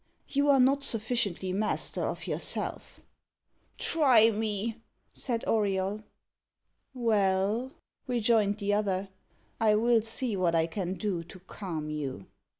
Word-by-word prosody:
You 285 Hz, +1 st, +1 dB
are 275 Hz, -1 st, +6 dB
not 270 Hz, +2 st, +4 dB
sufficiently 215 Hz, -6 st, -1 dB
master 210 Hz, +3 st, 0 dB
of -, -, -5 dB
yourself." -, -, -3 dB, 0.8 s
"Try 250 Hz, -8 st, +5 dB
me," 220 Hz, +1 st, -3 dB, 0.3 s
said 235 Hz, -3 st, -3 dB
Auriol. 200 Hz, -1 st, 0 dB, 0.9 s
"Well," 215 Hz, 0 st, +1 dB, 0.4 s
rejoined 225 Hz, -4 st, +2 dB
the 205 Hz, -1 st, -1 dB
other, 200 Hz, -2 st, 0 dB, 0.5 s
"I 215 Hz, -2 st, +4 dB
will 230 Hz, +1 st, +3 dB
see 225 Hz, +1 st, -2 dB
what 175 Hz, -3 st, +1 dB
I 160 Hz, 0 st, +3 dB
can 180 Hz, +2 st, -3 dB
do 185 Hz, -2 st, -2 dB
to 180 Hz, -, -12 dB
calm 170 Hz, -5 st, -6 dB
you." 135 Hz, -10 st, -5 dB
210 Hz, 120 wpm, -29 LUFS, 190-230 Hz, 0.9 s, are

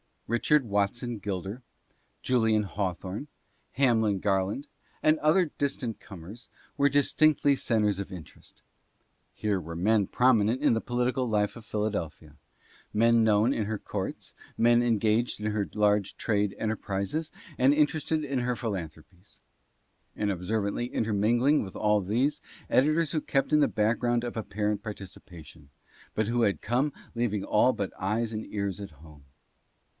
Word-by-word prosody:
Richard 135 Hz, +5 st, +2 dB
Watson 110 Hz, +3 st, -1 dB
Gil 95 Hz, -2 st, -3 dB
der, 100 Hz, +8 st, -7 dB, 0.6 s
Julian 110 Hz, -4 st, +2 dB
Hawthorne, 95 Hz, -, -4 dB, 0.5 s
Hamlin 110 Hz, -7 st, +2 dB
Garland, 100 Hz, +7 st, 0 dB, 0.4 s
and 155 Hz, +1 st, +4 dB
other 155 Hz, +2 st, +3 dB
distant 125 Hz, -6 st, -2 dB
com 95 Hz, -6 st, -11 dB
ers, 115 Hz, +7 st, -11 dB, 0.3 s
were 140 Hz, -, +4 dB
distinctly 145 Hz, +1 st, +3 dB
centres 105 Hz, -6 st, +1 dB
of 100 Hz, -1 st, -6 dB
interest. 85 Hz, -4 st, -13 dB, 0.7 s
Here 105 Hz, -3 st, -1 dB
were 85 Hz, -1 st, -7 dB
men 100 Hz, +3 st, +2 dB
promi 125 Hz, -4 st, +3 dB
nent 115 Hz, +4 st, 0 dB
in -, -, +4 dB
the 115 Hz, -, +1 dB
political 125 Hz, +1 st, -1 dB
life 105 Hz, 0 st, 0 dB
of 115 Hz, -, -12 dB
Philadelphia, 85 Hz, -9 st, -4 dB, 0.6 s
men 115 Hz, +1 st, +4 dB
known 110 Hz, +4 st, +3 dB
in 110 Hz, -, -1 dB
her 110 Hz, +1 st, -2 dB
courts, -, -, -5 dB, 0.2 s
men 120 Hz, +1 st, +4 dB
engaged 115 Hz, -1 st, +1 dB
in 105 Hz, 0 st, -1 dB
her 105 Hz, -1 st, -2 dB
large 105 Hz, -2 st, +2 dB
trade 105 Hz, -3 st, 0 dB
enterprises 110 Hz, +7 st, -2 dB, 0.3 s
and 130 Hz, +3 st, +5 dB
interested 155 Hz, +1 st, +1 dB
in 140 Hz, -2 st, -1 dB
her 125 Hz, 0 st, -1 dB
philanthropies; 90 Hz, -4 st, -7 dB, 0.8 s
and 105 Hz, -1 st, 0 dB
observantly 100 Hz, +5 st, -2 dB
intermingling 120 Hz, +5 st, +2 dB
with 95 Hz, -, -7 dB
all 105 Hz, 0 st, +2 dB
these, 125 Hz, +10 st, 0 dB, 0.3 s
editors 155 Hz, +3 st, +3 dB
who 155 Hz, -, 0 dB
kept 135 Hz, 0 st, 0 dB
in 150 Hz, -, +6 dB
the 150 Hz, -, +4 dB
background 120 Hz, +2 st, +1 dB
of 120 Hz, -1 st, -5 dB
apparent 105 Hz, -1 st, -2 dB
participa 95 Hz, -6 st, -9 dB
tion, 75 Hz, -4 st, -16 dB, 0.5 s
but 110 Hz, -1 st, 0 dB
who 120 Hz, +1 st, +1 dB
had 100 Hz, -3 st, +1 dB
come 130 Hz, +6 st, 0 dB, 0.2 s
leaving 115 Hz, -4 st, -1 dB
all 105 Hz, +6 st, +3 dB
but 100 Hz, -2 st, -3 dB
eyes 110 Hz, +4 st, -1 dB
and 110 Hz, 0 st, -4 dB
ears 100 Hz, -2 st, -3 dB
at 100 Hz, -3 st, -7 dB
home. 75 Hz, -1 st, -17 dB
110 Hz, 150 wpm, -28 LUFS, 100-125 Hz, 0.8 s, in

